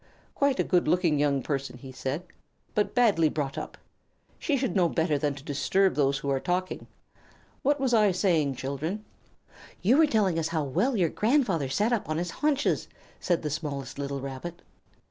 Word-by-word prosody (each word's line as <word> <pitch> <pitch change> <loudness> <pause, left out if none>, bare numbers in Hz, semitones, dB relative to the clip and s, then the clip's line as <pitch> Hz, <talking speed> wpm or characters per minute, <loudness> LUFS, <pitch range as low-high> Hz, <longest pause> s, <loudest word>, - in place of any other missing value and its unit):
"Quite 280 -2 +1
a - - +4
good 180 -2 +2
looking 175 -5 +2
young 140 -2 +1
person," 135 -3 -3
he 130 +1 -10
said, 135 +5 -3 0.5
"but 210 +3 0
badly 205 -11 +4
brought 145 -3 -3
up. - - -6 0.6
She 290 -3 0
should 260 -3 -1
know 180 -3 +3
better 160 -2 +1
than 145 -1 0
to 140 - -11
disturb 185 +6 +1
those 140 -1 +2
who 140 - -4
are 135 - +1
talking. 180 +4 -2 0.7
What 290 +1 +2
was 265 -2 +1
I 210 -3 +5
saying, 165 -7 +1
children?" 155 - -4 0.8
"You 235 +9 +5
were 320 -1 +6
telling 205 - +2
how 165 -1 0
well 195 - 0
your 175 -4 +2
grandfather 210 - +1
sat 210 - +1
up 220 -9 -1
on 155 - -1
his 175 +1 -2
haunches," 290 - 0 0.3
said 175 -3 0
the 150 - -2
smallest 140 -3 -4
little 140 -1 -3
Rabbit. 140 +6 -7
165 Hz, 180 wpm, -27 LUFS, 140-210 Hz, 0.8 s, were